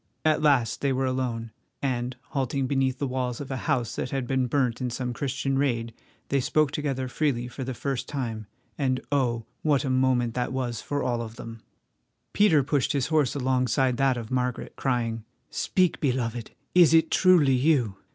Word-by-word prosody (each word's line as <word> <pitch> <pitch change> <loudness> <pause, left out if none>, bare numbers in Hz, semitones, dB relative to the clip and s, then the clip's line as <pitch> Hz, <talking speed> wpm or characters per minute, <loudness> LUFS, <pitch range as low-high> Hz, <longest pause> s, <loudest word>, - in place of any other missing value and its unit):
At 155 -1 +3
last 135 -7 +2
they 140 - +1
were 130 0 0
alone 125 -3 -2 0.3
and, 125 -2 -2
halting 135 0 -1
beneath 130 -1 0
the 140 - -2
walls 125 -2 -2
of 140 -1 -6
a - - -1
house 120 -4 0
that - - -2
had 135 -2 -2
been 130 0 0
burnt 125 -2 0
in 125 - -1
some 125 0 -3
Christian 135 +1 -1
raid, 115 -5 0 0.4
they 140 - +2
spoke 150 +2 +2
together 135 -3 -2
freely 125 -3 -1
for 130 +2 -6
the 130 0 -4
first 135 0 -3
time, 115 -7 -4 0.3
and 130 -2 +1
oh! 120 -5 +1 0.2
what 145 -3 +2
a 130 - 0
moment 130 -2 +2 0.2
was 125 -3 -2
that - - -18
for 145 0 -1
all 120 -2 0
of 115 -1 -7
them! 115 -1 -9 0.7
Peter 170 -9 +4
pushed 140 -1 0
his 140 -1 0
horse 150 -5 +2
alongside 130 -1 +1
that 135 -1 +2
of 115 -1 -6
Margaret, 125 -1 -2
crying: 115 -4 -1 0.3
"Speak, 185 -3 +1
beloved. 120 -4 -1 0.2
Is 175 -2 +6
it 160 - +4
truly 170 -7 +5
you?" 125 -7 +2
130 Hz, 180 wpm, -26 LUFS, 120-140 Hz, 0.7 s, Is